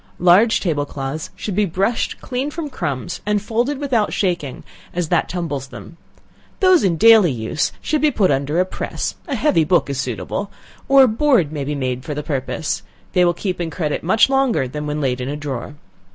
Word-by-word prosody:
Large 185 +6 +4
table 150 -6 -1
cloths 140 +3 -5
should 205 - -4
be 210 +1 +3
brushed 195 +7 -1
clean 260 +2 -3
from 300 -1 -5
crumbs, 145 - -4
and 210 0 +1
folded 235 +7 -1
without 260 -7 0
shaking, 170 -8 -2 0.3
as 175 -3 -1
that - - +1
tumbles 160 -7 -3
them; 165 - -11 0.6
those 370 -3 +5
in 175 -4 +2
daily 220 -3 +7
use 115 +4 -1
should 305 -1 0
be 305 - +4
put 205 - +2
under 140 +4 0
a 185 - +3
press - - -4
a 285 - -2
heavy 235 - +3
book 155 -2 +2
is 135 - -3
suitable, 130 - -4 0.4
or 275 0 +8
a - - +6
board 230 - +2
may 150 -3 -3
be 145 +2 -3
made 130 -2 -2
for 150 - -5
the 150 - -4
purpose; 145 +2 -2 0.3
they 180 - +4
will 175 -1 +2
keep 180 -1 -3
in 165 - -2
credit 155 -3 -2
much 215 +6 +4
longer 270 - +1
than 150 +3 -5
when 150 +1 -2
laid 125 -2 -1
in 125 - -3
a 145 - -3
drawer. 145 -1 -5
175 Hz, 200 wpm, -20 LUFS, 145-225 Hz, 0.6 s, or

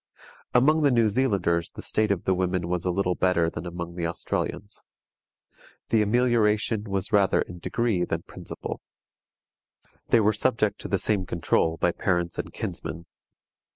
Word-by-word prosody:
Among 150 +6 +5
the 145 - +4
New 115 -4 +3
Zealanders 100 -8 +1
the - - -10
state 110 0 0
of 100 -3 0
the 95 - +2
women 90 -1 -1
was 90 0 -2
a - - +1
little 90 0 +1
better 85 -3 +2
than 85 +2 -6
among 85 0 -6
the 85 -1 -2
Australians. 100 +4 -4 1.1
The 110 - +3
amelioration 110 -1 +2
was 100 0 -3
rather 100 -2 +4
in 90 0 -10
degree 110 -1 0
than 85 -1 -2
principle. - - -7 1.3
They 120 - +5
were 105 0 +3
subject 105 -2 0
to - - -5
the 100 - +1
same 95 -1 0
control 80 -1 +1
by 85 - +2
parents 85 -2 -1
and - - -4
kinsmen. 85 0 -5
95 Hz, 155 wpm, -26 LUFS, 85-110 Hz, 1.3 s, Among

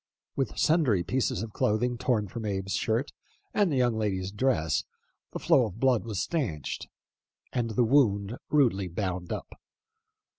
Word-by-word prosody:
With 135 - -2
sundry 140 - +3
pieces 105 -1 0
of 110 -2 -7
cloth 105 +2 +1 0.2
torn 110 -6 +1
from 115 +4 -6
Abe's 95 -2 -2
shirt 115 +5 0 0.4
and 205 -5 +2
the - - +1
young 125 -3 +2
lady's 95 -3 -1
dress, 105 - +1 0.5
the - - -4
flow 125 - +4
of 105 +1 -10
blood 130 -4 +3
was 105 -5 -3
stanched, 110 - -2 0.7
and 120 -2 0
the 120 - +4
wound 110 -5 +3
rudely 120 -10 +3
bound 90 -1 -3
up. - - -5
110 Hz, 150 wpm, -28 LUFS, 95-130 Hz, 0.7 s, flow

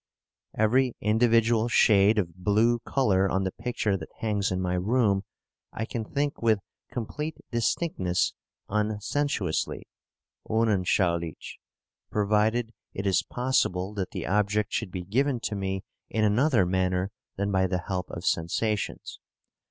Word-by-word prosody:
Every 125 +4 +3
individual 115 +1 +3
shade 105 -2 +5
of 85 -5 0
blue 105 +6 +2
colour 100 -7 +2
on 95 +1 +1
the 95 - -1
picture 110 -4 -1
that - - -9
hangs 105 -3 0
in 90 - -1
my 90 -1 -1
room 100 +1 +2 0.5
I 110 - -3
can 115 -1 -4
think 145 +4 -2
with 110 -2 +4 0.3
complete 145 +6 -4
distinctness 115 - 0 0.3
unsensuously 105 - -1 0.7
(unanschaulich), 90 -7 0 0.5
provided 110 +3 +1 0.2
it 100 - -3
is 95 -2 +3
possible 105 -7 0
that 95 -3 -3
the - - -5
object 105 +1 +1
should - - -1
be 90 0 -5
given 125 +7 +1
to - - -2
me 95 -1 -2 0.3
in 110 - 0
another 110 0 +3
manner 90 +1 0 0.3
than 100 +1 -1
by 95 -1 +2
the 90 -2 -2
help 90 -2 -2
of 85 +2 -7
sensations. 100 +5 -1
105 Hz, 130 wpm, -27 LUFS, 95-115 Hz, 0.7 s, shade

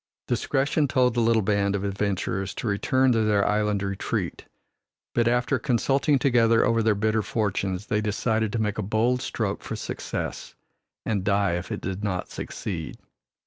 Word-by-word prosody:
Discretion 140 +2 +1
told 130 -3 +2
the 120 - 0
little 115 -1 +3
band 100 0 +1
of 100 - -2
adventurers 100 -1 -2
to - - -5
return 130 +5 +2
to 115 -2 +2
their 105 -2 +2
island 105 -1 +1
retreat, 100 -1 -3 0.7
but 120 -1 +2
after 125 +2 +1
consulting 135 +3 +2
together 115 -3 +4
over 115 -2 +2
their 110 -1 +3
bitter 110 +2 +1
fortunes, 100 -2 -2
they 105 -2 0
decided 110 +1 0
to 115 - 0
make 105 -1 -1
a - - +1
bold 115 +5 +1
stroke 110 -6 -2
for - - -5
success - - -5 0.5
and 105 -4 0
die 100 -1 +2
if 90 +1 -3
it - - -3
did 95 +1 -4
not 95 -3 -2
succeed. - - -5
110 Hz, 165 wpm, -25 LUFS, 100-120 Hz, 0.7 s, together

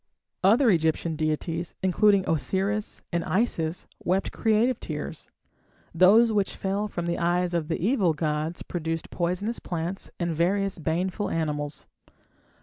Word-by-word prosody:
Other 225 +5 +5
Egyptian 160 -1 +1
deities, 160 +2 -2
including 195 +1 +3
Osiris 190 +6 -1
and 170 -1 0
Isis, 175 -6 0 0.2
wept 185 +2 0
creative 225 +3 +2
tears. - - -6 0.6
Those 205 +7 +6
which 205 -2 0
fell 200 +2 -1
from 175 -4 -4
the 170 0 -1
eyes 175 +1 +1
of 165 -3 0
the 165 - -2
evil 195 -4 +2
gods 155 +1 -2
produced 165 -2 -4
poisonous 185 +6 -1
plants 175 +2 -4
and 170 -2 -1
various 195 +3 +1
baneful 180 +6 -1
animals. 150 -2 -3
175 Hz, 130 wpm, -26 LUFS, 165-200 Hz, 0.6 s, Those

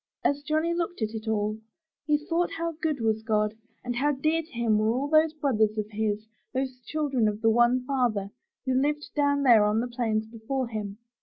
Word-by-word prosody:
As 285 0 +1
Johnny 310 +3 0
looked 340 -6 -2
at 215 +1 -2
it 220 0 -6
all, 215 0 0 0.5
he 300 -1 +4
thought 330 +3 -1
how 335 0 -2
good 310 -4 -2
was 220 -1 +1
God 210 -1 +1 0.3
and 245 -1 -3
how 290 +4 +2
dear 310 +4 +1
to 325 - -18
him 230 -3 +1
were 215 +1 +2
all 260 +4 -1
those 310 +1 +4
brothers 230 -9 +1
of 215 0 -3
his, 215 0 -1 0.3
those 260 -1 -2
children 275 -7 +1
of 210 0 -1
the 225 0 +4
one 240 +2 +3
Father, 240 -7 0 0.3
who 260 - +1
lived 295 +3 0
down 285 -1 +2
there 235 -5 +7
on 210 +1 +2
the 240 - -1
plains 225 -3 -1
before 230 +3 -4
him. 210 -3 -5
245 Hz, 205 wpm, -27 LUFS, 220-295 Hz, 0.5 s, there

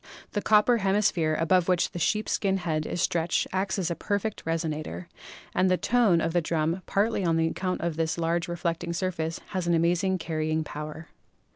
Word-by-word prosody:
The 205 - -1
copper 215 +3 +4
hemisphere 190 -6 +2
above 175 +2 +3
which 180 -2 +2
the 175 - -5
sheepskin 200 +1 +1
head 160 -4 -2
is 175 - -1
stretched 170 0 +1
acts 190 +2 0
as 180 -3 -1
a - - -1
perfect 205 +3 -2
resonator, 155 - -3 0.5
and 185 - +3
the 185 - +3
tone 210 -7 +3
of 165 0 -1
the 175 - +3
drum, 165 +2 -1
partly 205 0 +1
on 165 -2 +2
account 180 +3 -1
of 170 -2 -2
this 160 0 0
large 170 +1 0
reflecting 170 0 -2
surface, 165 -3 -2
has 185 -2 -2
an 170 - +3
amazing 175 +3 +2
carrying 155 -1 -1
power. 155 +2 -7
170 Hz, 175 wpm, -27 LUFS, 160-190 Hz, 0.5 s, copper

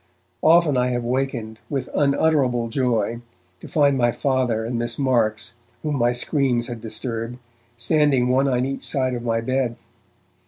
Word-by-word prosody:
Often 160 -4 +5
have 125 - +3 0.2
I - - -6
wakened, 120 -3 -2
with 140 -3 -2
unutterable 140 -5 +2
joy, 115 -2 0 0.4
to - - -10
find 145 -3 +3
my 120 -1 +3
Father 125 -5 0
and 120 +1 -2
Miss 120 0 -2
Marks, 115 -4 +1 0.3
whom 150 -2 -1
my 120 -1 +3
screams 125 -1 +1
had 120 -3 -6
disturbed, 115 +1 -5 0.4
standing 140 0 +2
one 135 +2 +3
on 125 -1 +1
each 135 0 -4
side 130 -2 0
of 120 - -3
my 115 -1 0
bed. 130 0 -1
125 Hz, 155 wpm, -22 LUFS, 115-135 Hz, 0.4 s, Often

